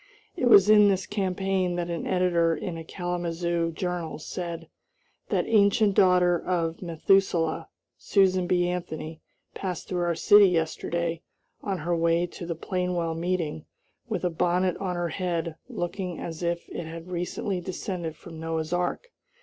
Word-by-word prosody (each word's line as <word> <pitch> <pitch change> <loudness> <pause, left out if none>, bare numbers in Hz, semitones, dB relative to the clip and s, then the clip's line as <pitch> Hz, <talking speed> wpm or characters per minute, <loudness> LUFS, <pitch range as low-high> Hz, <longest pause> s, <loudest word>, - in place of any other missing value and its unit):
It 300 - -1
was 200 -4 +8
in 210 -1 +7
this 190 -1 0
campaign 190 -2 -1
that 175 0 -2
an 170 - -3
editor 175 -3 +2
in 175 0 -5
a 165 - -6
Kalamazoo 170 -1 -2
journal 175 -2 -3
said: 170 +1 -6 0.6
"That - - +1
ancient 205 -1 +4
daughter 180 -2 +4
of 165 -2 -1
Methuselah, 170 -1 +1 0.3
Susan 185 -2 +2
B. 175 -1 +2
Anthony, 160 -3 -5 0.3
passed 180 -4 -4
through 180 -1 -2
our 170 -1 +1
city 205 +4 +7
yesterday, 165 0 -1 0.4
on 195 -2 -2
her 175 +1 -1
way 170 +1 +2
to 175 0 -8
the 170 - -2
Plainwell 180 -1 -2
meeting, 165 -3 -2 0.4
with 205 -5 -2
a 180 - +1
bonnet 180 +2 +1
on 185 -2 -3
her 175 -1 -1
head 170 -2 -2
looking 180 0 -4
as 165 -1 -6
if 170 0 -2
it 170 - -5
had 165 +2 -8
recently 180 +1 -2
descended 175 -2 -4
from 165 0 -11
Noah's 160 0 -3
ark." 180 - -2
175 Hz, 150 wpm, -26 LUFS, 165-185 Hz, 0.6 s, was